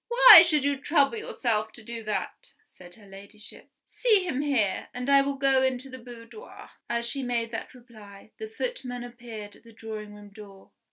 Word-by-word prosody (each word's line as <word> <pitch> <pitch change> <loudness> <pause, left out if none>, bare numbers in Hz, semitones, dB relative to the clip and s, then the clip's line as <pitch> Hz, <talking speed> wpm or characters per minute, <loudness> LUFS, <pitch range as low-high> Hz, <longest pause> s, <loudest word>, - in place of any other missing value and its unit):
"Why 480 -7 +9
should 305 -5 0
you 285 -1 0
trouble 285 +4 +1
yourself 220 - -2
to 240 - -13
do 235 +1 -7
that?" 210 - -5
said 175 - -15
her 215 - -18
Ladyship. 200 +2 -13 0.2
"See 430 -6 +1
him 280 -5 -2
here; 250 -10 -1
and 250 +1 -5
I 275 0 +6
will 280 0 -3
go 270 -1 +2
into 260 0 -2
the 260 - -10
boudoir." 240 - -13 0.2
As 235 0 -1
she 275 +3 -3
made 235 -2 -3
that 225 +2 -7
reply, 215 -4 -16
the 440 0 -7
footman 435 - -6
appeared 235 -4 -10
at - - -24
the 230 - -17
drawing 215 -2 -9
room 205 0 -14
door. 200 -2 -15
240 Hz, 185 wpm, -26 LUFS, 215-275 Hz, 0.2 s, Why